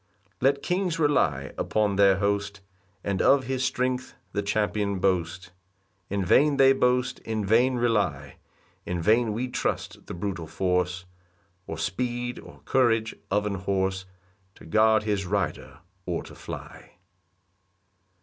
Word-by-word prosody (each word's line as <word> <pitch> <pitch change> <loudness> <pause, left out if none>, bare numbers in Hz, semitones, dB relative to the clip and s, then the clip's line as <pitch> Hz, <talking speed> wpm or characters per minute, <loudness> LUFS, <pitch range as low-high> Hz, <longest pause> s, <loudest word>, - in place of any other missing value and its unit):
2 - - -2
Let 140 0 +1
kings 180 -2 0
rely 90 - +1
upon 105 -2 +1
their 100 -1 +5
host, 100 0 -1 0.4
And 100 -2 -1
of 140 -1 +5
his 130 +1 -2
strength 125 0 -1 0.2
the 100 - -1
champion 100 -1 0
boast; 90 -1 -1 0.6
In 100 -1 -1
vain 140 - +4
they 135 0 +6
boast, 125 -1 +1
in 110 -2 -3
vain 120 +5 +3
rely; 105 - 0 0.5
In 90 -1 -3
vain 110 +6 +3
we 120 +4 -2
trust 125 - -3
the - - -6
brutal 90 -3 -4
force, 90 0 -1 0.6
Or 80 - -5
speed, 120 +7 -2
or - - -14
courage 115 -4 +2 0.2
of 105 +2 +1
an 105 - -1
horse, 95 -1 -1 0.5
To - - -15
guard 110 +5 +4
his 100 -3 -1
rider, 95 -4 -3 0.3
or 85 -2 -2
to - - -12
fly. - - -9
105 Hz, 140 wpm, -26 LUFS, 95-125 Hz, 0.6 s, they